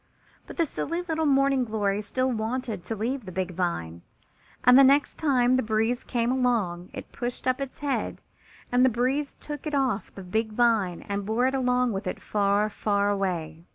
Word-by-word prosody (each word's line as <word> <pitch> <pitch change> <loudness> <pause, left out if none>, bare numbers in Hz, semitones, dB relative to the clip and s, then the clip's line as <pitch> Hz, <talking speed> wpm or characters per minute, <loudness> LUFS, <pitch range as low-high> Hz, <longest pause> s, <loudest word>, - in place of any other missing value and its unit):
But - - -10
the 335 - +3
silly 335 +4 -3
little 320 -2 -1
Morning 275 -1 +3
glory 210 -3 -1
still 255 +5 -1
wanted 225 -3 -3
to 225 - -3
leave 245 +5 -2
the 185 - -7
big 185 0 -2
vine, 85 - -3 0.6
and 250 +1 +7
the 275 - +9
next 280 +2 +3
time 255 -4 +3
the - - +2
breeze 225 +2 0
came 240 -1 0
along 225 -9 0
it - - -9
pushed 245 +1 -4
up 255 +2 +1
its 275 -1 -5
head 285 -2 -3 0.5
and 245 +1 +4
the 260 - +6
breeze 260 +5 -1
took 295 0 -7
it 300 - -1
off 255 -8 0
the 195 - -10
big 220 +4 -2
vine 215 -7 +2
and 200 0 -4
bore 225 +3 +1
it 260 - +1
along 250 -2 +1
with 195 0 -4
it - - -3
far, 205 0 +1
far 205 -1 0
away. 170 -5 -3
235 Hz, 190 wpm, -26 LUFS, 200-260 Hz, 0.6 s, the